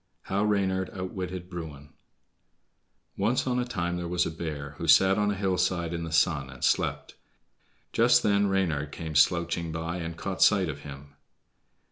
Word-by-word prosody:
How 100 +2 -1
Reynard 95 -3 0
Outwitted 95 -1 -5
Bruin 80 -5 -8 1.3
Once 110 +6 +1
on 125 -1 0
a 125 - 0
time 90 -7 -2
there 90 -1 -4
was 90 0 +1
a - - -3
bear, 75 -4 -5
who 85 - -4
sat 95 +6 +6
on 105 0 +2
a 100 - 0
hillside 90 -3 0
in 85 0 -3
the 80 - -7
sun 80 -4 +2
and - - -11
slept. - - 0 0.8
Just 120 +1 +4
then 100 0 +3
Reynard 80 -7 0
came 80 +1 -6
slouching 85 +2 +2
by 80 +2 -3
and 85 -1 -5
caught 95 +1 -4
sight 95 -5 +5
of 75 -1 -5
him. 70 0 -11
85 Hz, 165 wpm, -27 LUFS, 80-95 Hz, 1.3 s, sat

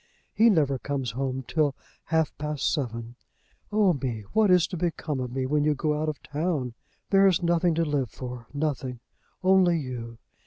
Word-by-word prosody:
He 230 +2 +5
never 145 - +2
comes 135 -4 -2
home 130 +2 -2
till 150 -4 +1 0.3
half 160 -1 +1
past 150 -1 -1
seven. 120 -4 -4 0.5
Oh 205 -3 +4
me! 125 -6 -3
what 220 -2 +4
is 180 -2 +5
to - - -4
become 160 -4 -2
of 125 -1 -3
me 130 +1 -2
when 145 +2 +1
you 150 0 +2
go 150 +2 0
out 155 - 0
of 150 - -6
town? 145 -5 -2 0.4
There 195 0 +6
is 180 -2 +2
nothing 170 0 +2
to 165 0 +1
live 145 -5 0
for, 125 0 -8
nothing; 140 -4 -2 0.4
only 185 -2 +5
you. 120 -5 -6
150 Hz, 180 wpm, -27 LUFS, 130-170 Hz, 0.5 s, There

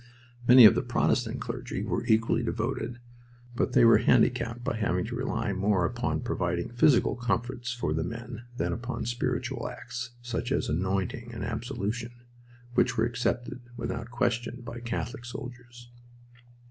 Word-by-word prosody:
Many 125 -1 +10
of 105 - +10
the - - +1
Protestant - - 0
clergy - - -4
were - - -1
equally 115 +1 +3
devoted, 120 +1 -2 0.6
but - - 0
they - - +6
were 115 - +7
handicapped 120 0 +2
by 120 - -1
having 95 -2 0
to 120 +2 -5
rely 115 -4 -1
more 95 -2 +2
upon 120 +6 -1
providing 90 -5 -1
physical 120 +2 +4
comforts 120 0 -2
for 115 -11 -1
the 80 +1 0
men 115 +4 -6
than - - 0
upon 120 +1 -4
spiritual 120 +1 -2
acts, 125 +1 -6
such 120 +1 -3
as 140 - +1
anointing 95 - -1
and - - -4
absolution, 115 0 -3 0.6
which 120 0 +2
were 110 - +3
accepted 120 +1 -2 0.2
without 115 -1 -4
question 120 0 -1
by 120 0 -6
Catholic 120 0 -4
soldiers. 120 -1 -9
120 Hz, 145 wpm, -28 LUFS, 115-120 Hz, 0.6 s, Many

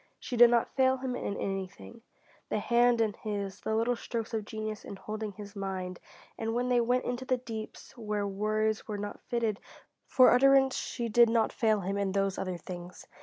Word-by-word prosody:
She 250 - -5
did 240 0 +8
not 235 -1 +1
fail 260 -1 +3
him 255 -1 -3
in 200 - -3
anything: 195 +4 -5 0.5
the - - 0
hand 240 -1 +3
in 215 -2 +1
his, 200 -3 -5
the 220 - -1
little 230 +2 +1
strokes 230 -1 -5
of 220 -2 -2
genius 215 -1 -5
in - - -8
holding 215 +1 -5
his 205 +1 -10
mind, 190 -2 -4 0.4
and 225 0 -2
when 245 +1 0
they 245 -1 +4
went 245 +2 +1
into 245 +1 -3
the 255 -1 +1
deeps 225 -3 -8
where 210 -3 -2
words 215 +2 -1
were 210 -2 -3
not 205 0 -6
fitted 230 -4 -1 0.5
for 255 -1 +6
utterance 270 +1 +5
she 235 -2 -3
did 235 +1 +5
not 225 -1 +2
fail 220 -3 +2
him 195 +2 -2
in 195 -1 -1
those 195 -1 0
other 185 -2 -3
things. 175 +1 -9
220 Hz, 195 wpm, -30 LUFS, 200-240 Hz, 0.5 s, did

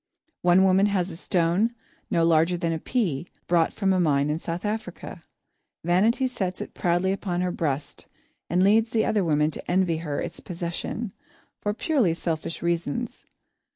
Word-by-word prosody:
One 180 +1 +5
woman 190 +1 +4
has 190 -2 0
a - - -7
stone, 180 +7 +1 0.3
no 165 -1 +2
larger 165 +2 +3
than 170 -1 -1
a 160 - -2
pea, 175 - -1 0.2
brought 170 -2 +3
from 195 -2 +1
a 185 - +2
mine 145 -3 +2
in 155 - -1
South 170 +3 -4
Africa. 210 -5 -5 0.6
Vanity 205 +10 +3
sets 190 -8 -2
it - - -6
proudly 175 +2 +1
upon 185 -2 -2
her 180 0 0
breast 145 -4 -3 0.4
and 180 +2 +3
leads 225 +3 +3
other 215 -2 +2
women 150 -2 +2
to - - -8
envy 180 -3 +2
her 150 -3 -3
its - - -5
possession, 175 +5 -4 0.5
for 205 0 -2
purely 240 - +1
selfish 165 -1 -3
reasons. 170 -3 -2
175 Hz, 160 wpm, -25 LUFS, 165-195 Hz, 0.6 s, One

